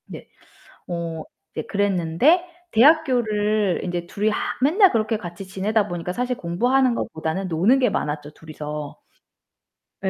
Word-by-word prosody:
네, - - -10 0.6
어 165 -2 -4 0.3
네 - - -3
그랬는데 200 - +2 0.3
대학교를 220 - +3
인제 175 -1 -3
둘이 205 +4 -1
하 - - -1 0.2
맨날 365 +8 +5
그렇게 220 -1 0
같이 175 0 -8
지내다 200 +3 0
보니까 175 -1 -4
사실 250 +3 -1
공부하는 245 +9 +1
것보다는 160 0 -3
노는 185 +11 +3
게 255 -2 +2
많았죠, 150 0 -3
둘이서. 150 -2 -7 1.1
예, - - +1
200 Hz, 290 characters per minute, -22 LUFS, 170-240 Hz, 1.1 s, 맨날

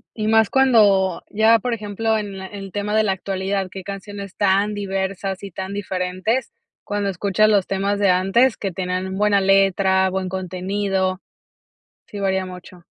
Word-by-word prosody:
Y 215 -1 -2
más 220 -1 +4
cuando 205 -9 +3
ya 220 +2 +4
por 245 +3 -3
ejemplo 220 0 -1
en 200 -2 -5
le 190 - -6
el 195 -1 -8
tema 205 +1 -3
de 220 - +4
la 200 -2 +1
actualidad, 190 0 -2
qué 190 - -8
canciones 200 0 -8
tan 205 +1 +2
diversas 195 -1 -3
y 200 - -7
tan 190 +2 -6
diferentes 190 +4 -2 0.3
cuando 205 -1 -2
escuchas 200 +3 +2
los 200 -3 +3
temas 200 +1 -1
de 200 -2 +3
antes 195 +8 +3
que 195 -2 -3
tenían 185 +1 -3
buena 205 0 +3
letra, 190 -1 +3
buen 185 0 -2
contenido. 190 +1 -2 0.8
Sí 205 - -8
varía 190 -1 0
mucho. 180 -1 -12
195 Hz, 160 wpm, -21 LUFS, 190-205 Hz, 0.8 s, más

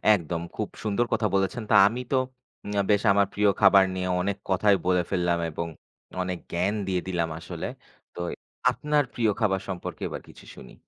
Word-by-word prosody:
একদম 85 -1 -3
খুব - - -2 0.2
সুন্দর 110 +3 +1
কথা 110 -1 +2
বলেছেন। 95 +4 0
তা, - - +6
আমি 120 +4 -3
তো - - +3 0.5
উম 105 - -4 0.2
বেশ 100 0 +3
আমার 100 -1 +3
প্রিয় 105 0 +3
খাবার 100 -1 +7
নিয়ে 90 0 -2
অনেক 100 +1 -1
কথাই 100 +2 +4
বলে 90 -1 +4
ফেললাম 90 -2 +1
এবং 85 +2 -3 0.5
অনেক 90 -1 -2
জ্ঞান 90 +4 +1
দিয়ে 90 -2 0
দিলাম 85 -3 -1
আসলে। 85 -1 -5 0.5
তো - - -10 0.5
আপনার 150 -1 +1
প্রিয় 110 -3 +2
খাবার 95 -3 +1
সম্পর্কে 90 -2 -5
এবার - - -6
কিছু - - -15
শুনি। - - -12
95 Hz, 175 wpm, -26 LUFS, 90-105 Hz, 0.5 s, খাবার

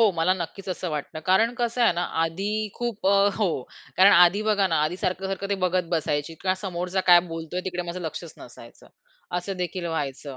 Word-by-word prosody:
हो 230 - +7
मला 165 +1 +2
नक्कीच 190 +2 -7
असं 180 -1 -3
वाटतं. 150 +1 -5
कारण 220 +6 +4
कसं 240 0 0
आहे 230 - +5
ना 175 +1 -2 0.2
आधी 170 +5 -2 0.2
खूप 235 -5 -4
अ 195 - +5 0.2
हो 210 -3 +1 0.5
कारण 195 +2 +7
आधी 180 +4 +5
बघा 205 -2 +3
ना 165 -3 0
आधी 160 +4 -2
सारखं-सारखं 190 +1 -2
ते - - +3
बघत 180 -1 -1
बसायची 150 0 -2
किंवा 185 -1 +2
समोरचा 180 0 -2
काय 175 0 +9
बोलतोय 165 +2 -4
तिकडे 180 -1 -2
माझं 180 +1 -6
लक्षच 160 +1 -7
नसायचं. - - -15 0.5
असं 195 +2 -5
देखील 175 0 -5
व्हायचं. 140 -2 -5
180 Hz, 190 wpm, -25 LUFS, 165-195 Hz, 0.5 s, काय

